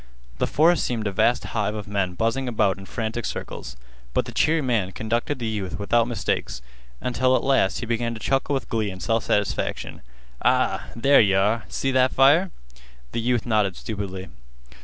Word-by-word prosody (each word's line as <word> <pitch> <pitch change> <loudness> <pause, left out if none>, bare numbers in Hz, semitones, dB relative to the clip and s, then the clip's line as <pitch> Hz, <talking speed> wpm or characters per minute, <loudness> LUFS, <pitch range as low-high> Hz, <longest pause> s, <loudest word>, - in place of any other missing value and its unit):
The - - +1
forest 165 +3 +3
seemed 115 -3 -2
a 100 - 0
vast 120 +5 +2
hive 105 -1 -2
of 105 -1 -6
men 100 -3 -1
buzzing 115 +6 0
about 100 -5 +1
in 95 - -11
frantic 115 0 -3
circles, 70 -7 -6 0.4
but - - +2
the - - -7
cheery 155 0 +2
man 110 -7 0
conducted 120 +6 -2
the 120 - -4
youth 105 -5 -3
without 115 +3 +2
mistakes, 115 - -2 0.4
until 130 +1 +2
at - - 0
last 135 -8 +2
he - - -3
began 115 0 -1
to - - -8
chuckle 135 +4 0
with 135 - -3
glee 110 -2 -1
and 95 -1 -8
self 115 -1 0
satisfaction. 105 -1 -1 0.4
"Ah, - - +2
there 135 +5 +5
yeh 100 -3 +3
are! 105 +2 +1
See 135 - -1
that 130 0 +3
fire?" 145 +8 +5 0.6
The 115 - -2
youth 120 -1 0
nodded 105 -5 +1
stupidly. 95 -4 -5
115 Hz, 180 wpm, -24 LUFS, 100-130 Hz, 0.6 s, there